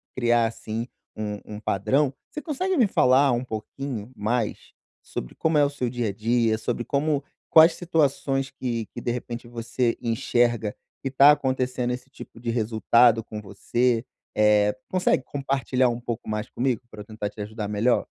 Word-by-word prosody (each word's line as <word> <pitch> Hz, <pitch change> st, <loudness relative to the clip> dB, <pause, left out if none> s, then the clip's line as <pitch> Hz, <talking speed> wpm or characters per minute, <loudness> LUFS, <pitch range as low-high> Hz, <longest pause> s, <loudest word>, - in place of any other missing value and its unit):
criar, 120 Hz, -2 st, +3 dB
assim, 115 Hz, +1 st, -5 dB, 0.3 s
u 105 Hz, -1 st, -4 dB
um -, -, -7 dB
padrão, 130 Hz, +8 st, +1 dB, 0.2 s
você 300 Hz, -, -5 dB
consegue 365 Hz, +4 st, -1 dB
me 245 Hz, -, +5 dB
falar 135 Hz, -4 st, +4 dB
um 120 Hz, +1 st, 0 dB
pouquinho 120 Hz, +1 st, -6 dB
mais 110 Hz, +1 st, -1 dB, 0.5 s
sobre -, -, -6 dB
como 160 Hz, -1 st, +1 dB
é 145 Hz, -, +5 dB
o -, -, 0 dB
seu 130 Hz, -4 st, -3 dB
dia 120 Hz, -3 st, -2 dB
a -, -, -4 dB
dia, 115 Hz, +1 st, +1 dB
sobre 120 Hz, +1 st, -2 dB
como 145 Hz, 0 st, 0 dB, 0.3 s
quais 160 Hz, +1 st, +8 dB
situações 140 Hz, -5 st, 0 dB
que 120 Hz, -5 st, -3 dB
que, -, -, -6 dB
de 120 Hz, -, -1 dB
repente, 120 Hz, -1 st, -5 dB
você 120 Hz, 0 st, -1 dB
enxerga 115 Hz, -1 st, +1 dB, 0.3 s
que 135 Hz, -, -1 dB
tá 140 Hz, +2 st, +8 dB
acontecendo 130 Hz, -3 st, 0 dB
esse 125 Hz, +2 st, -8 dB
tipo 115 Hz, -, -12 dB
de 120 Hz, 0 st, -4 dB
resultado 115 Hz, 0 st, +3 dB
com 105 Hz, -1 st, -7 dB
você? 120 Hz, +3 st, 0 dB, 0.3 s
Eh, 105 Hz, 0 st, +4 dB
consegue 180 Hz, -7 st, +2 dB
compartilhar 135 Hz, -2 st, 0 dB
um 120 Hz, 0 st, -3 dB
pouco 120 Hz, -1 st, -5 dB
mais 110 Hz, +2 st, -3 dB
comigo, 125 Hz, -2 st, -1 dB
pra 110 Hz, -, -9 dB
eu 105 Hz, -, -10 dB
tentar 110 Hz, -2 st, -4 dB
te 105 Hz, -, -17 dB
ajudar 105 Hz, 0 st, -5 dB
melhor? 105 Hz, +4 st, +1 dB
120 Hz, 170 wpm, -25 LUFS, 110-135 Hz, 0.5 s, quais